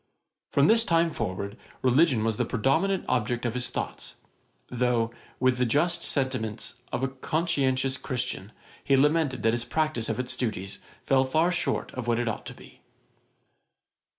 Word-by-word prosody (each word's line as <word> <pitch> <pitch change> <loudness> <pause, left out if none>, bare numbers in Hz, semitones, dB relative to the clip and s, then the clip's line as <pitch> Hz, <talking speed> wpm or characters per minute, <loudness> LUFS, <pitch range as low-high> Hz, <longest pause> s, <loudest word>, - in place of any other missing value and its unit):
From 140 - +3
this 225 +5 +5
time 165 -3 +2
forward 100 +1 -4 0.3
religion 130 -2 +4
was 110 -1 0
the - - +2
predominant 160 - +1
object 120 0 0
of 120 - 0
his 125 0 -1
thoughts; - - -5 0.5
though, 120 -2 0 0.3
with 130 -1 +2
the 125 - +3
just 170 +7 +2
sentiments 130 -6 -2 0.2
of 130 - -2
a - - +3
conscientious 135 -2 0
Christian, 115 -7 -3 0.3
he 135 -1 +3
lamented 150 -2 +2
that 115 0 +3
his 120 0 0
practice 155 -7 -1
of - - -2
its 125 0 -1
duties 100 -5 -3 0.3
fell 135 -1 +4
far 155 +6 +2
short 180 - -1
of 125 -2 -6
what 120 -1 +2
it 120 0 -1
ought 110 - -3
to - - -7
be. - - -16
130 Hz, 160 wpm, -27 LUFS, 115-150 Hz, 0.5 s, this